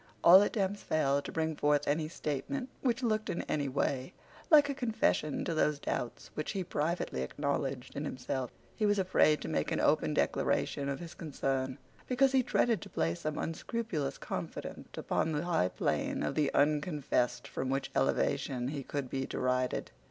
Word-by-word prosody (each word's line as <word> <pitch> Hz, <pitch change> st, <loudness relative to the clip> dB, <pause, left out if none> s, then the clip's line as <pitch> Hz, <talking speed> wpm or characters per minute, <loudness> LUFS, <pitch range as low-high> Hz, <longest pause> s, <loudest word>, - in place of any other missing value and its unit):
All 180 Hz, +3 st, +10 dB
attempts 205 Hz, -1 st, 0 dB
failed 140 Hz, -2 st, +1 dB
to -, -, -5 dB
bring 160 Hz, -1 st, -1 dB
forth 145 Hz, 0 st, +2 dB
any 155 Hz, +2 st, +1 dB
statement 210 Hz, -, -3 dB
which 250 Hz, -1 st, 0 dB
looked 215 Hz, -2 st, 0 dB
in -, -, -2 dB
any 145 Hz, -2 st, -1 dB
way 130 Hz, -1 st, -1 dB, 0.4 s
like 295 Hz, -4 st, +7 dB
a 280 Hz, -, -1 dB
confession 225 Hz, -, 0 dB
to 170 Hz, -, -1 dB
those 150 Hz, -2 st, +2 dB
doubts 125 Hz, -4 st, -4 dB
which 155 Hz, -, -3 dB
he 195 Hz, -2 st, -1 dB
privately 160 Hz, -, -1 dB
acknowledged 135 Hz, -, -2 dB
in 145 Hz, -, -3 dB
himself. 130 Hz, -2 st, -3 dB, 0.3 s
He 215 Hz, -, +1 dB
was 205 Hz, 0 st, +3 dB
afraid 180 Hz, -5 st, +3 dB
to -, -, -5 dB
make -, -, -1 dB
an -, -, 0 dB
open -, -, +2 dB
declaration 140 Hz, 0 st, 0 dB
of 140 Hz, -, -2 dB
his 170 Hz, -1 st, -8 dB
concern, 135 Hz, -4 st, -2 dB, 0.3 s
because 265 Hz, +1 st, +3 dB
he 265 Hz, -1 st, +4 dB
dreaded 230 Hz, -4 st, +2 dB
to -, -, -9 dB
place 80 Hz, +1 st, -1 dB
some 155 Hz, -1 st, -3 dB
unscrupulous 165 Hz, -, -3 dB
confidant -, -, -5 dB
upon 160 Hz, -, 0 dB
the 150 Hz, +3 st, -1 dB
high 165 Hz, -, +2 dB
plane -, -, -1 dB
of 75 Hz, -, -1 dB
the 145 Hz, -2 st, +1 dB
unconfessed 145 Hz, -4 st, +1 dB
from 130 Hz, -, -3 dB
which 135 Hz, +1 st, -1 dB
elevation 125 Hz, -1 st, +1 dB
he 145 Hz, -1 st, -3 dB
could 140 Hz, 0 st, -4 dB
be 135 Hz, +1 st, -3 dB
derided. 125 Hz, 0 st, -1 dB
150 Hz, 175 wpm, -32 LUFS, 135-190 Hz, 0.4 s, All